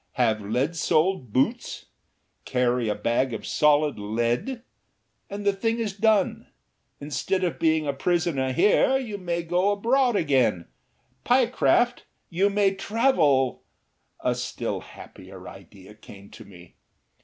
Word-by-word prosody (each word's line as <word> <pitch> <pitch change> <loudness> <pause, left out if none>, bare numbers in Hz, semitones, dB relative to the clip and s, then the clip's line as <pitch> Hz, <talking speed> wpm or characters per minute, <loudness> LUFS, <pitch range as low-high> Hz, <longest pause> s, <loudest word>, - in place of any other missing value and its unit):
Have 110 -4 +1
lead 125 +11 -1
soled 160 - 0
boots, 220 - -1 0.6
carry 125 -2 0
a 105 - 0
bag 120 +3 -1
of - - -8
solid 150 -4 +2
lead, 120 - -2 0.7
and 200 +1 -6
the 200 - +3
thing 225 +4 -1
is 220 -4 -3
done! 215 -2 +1 0.5
Instead 150 +6 -2
of 175 - -2
being 160 -1 +2
a 140 - -1
prisoner 140 -2 0
here 210 - +3
you 220 -6 -5
may 170 -2 -3
go 175 +4 +1
abroad 240 +4 +1
again, 130 - +1 0.6
Pyecraft; 245 -1 +2 0.3
you 190 +4 +2
may 200 -1 +2
travel 185 - +1 0.3
" - - -49 0.3
A - - +1
still - - -4
happier - - -13
idea 100 0 -14
came 100 -2 -15
to - - -13
me. 90 -3 -16
160 Hz, 130 wpm, -25 LUFS, 125-205 Hz, 0.7 s, the